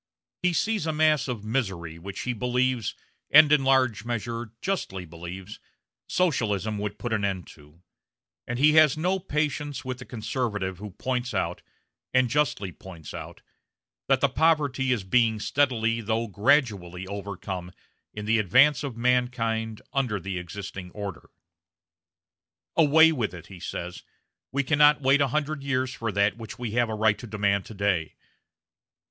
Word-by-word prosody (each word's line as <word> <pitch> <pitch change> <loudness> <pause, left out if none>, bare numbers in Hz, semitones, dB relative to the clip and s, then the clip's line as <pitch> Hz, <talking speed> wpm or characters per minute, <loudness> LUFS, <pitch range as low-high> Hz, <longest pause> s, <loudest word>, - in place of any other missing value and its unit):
He 180 -1 +2
sees 210 0 0
a - - +1
mass 155 -3 +3
of 115 -5 -4
misery 95 -9 -2
which 95 +3 -6
he 125 - -2
believes 125 0 0 0.3
and 150 0 +8
in 150 -2 +5
large 130 -6 +3
measure 115 -1 -4
justly 95 - -3
believes 85 +4 -9 0.5
Socialism 110 - 0
would 105 0 -4
put 120 -2 -3
an 105 -2 0
end 95 -3 -1
to; 75 +3 -18 0.6
and 120 - -3
he 150 +4 +5
has 155 -3 +6
no 180 +4 +1
patience 150 -4 -2
with 130 -1 -4
the 130 - -9
conservative 105 -6 -3
who 105 +1 -7
points 125 +5 -3
out - - -1 0.5
and 130 -2 +3
justly 140 -10 0
points 85 -3 -11
out - - -9 0.6
that 135 -2 +3
the 140 - +5
poverty 140 -2 +2
is 115 -6 0
being 110 +2 +2
steadily, 115 -3 +1
though 110 +1 -1
gradually, 100 - +1
overcome 95 -2 -6 0.4
in 105 0 -6
the 115 +1 +3
advance 130 - +4
of 130 -5 -5
mankind 115 -3 0
under 125 -7 0
the 95 0 -4
existing 95 +1 -7
order. 100 -5 -7 1.5
"Away 160 +1 +6
with 110 - -2
it," 85 - -10
he 90 - -10
says; 90 +1 -6 0.5
"we 140 +1 0
cannot 150 +1 +5
wait 135 +2 +4
a 140 - +4
hundred 150 +2 -2
years 130 -2 -1
for 115 -3 -3
that 100 +2 +1
which 115 -3 -8
we 120 -3 -4
have 120 +1 +1
a 110 - -2
right 110 -1 +2
to 120 - -8
demand 100 -2 0
today." 100 -6 -1
115 Hz, 155 wpm, -26 LUFS, 100-135 Hz, 1.5 s, and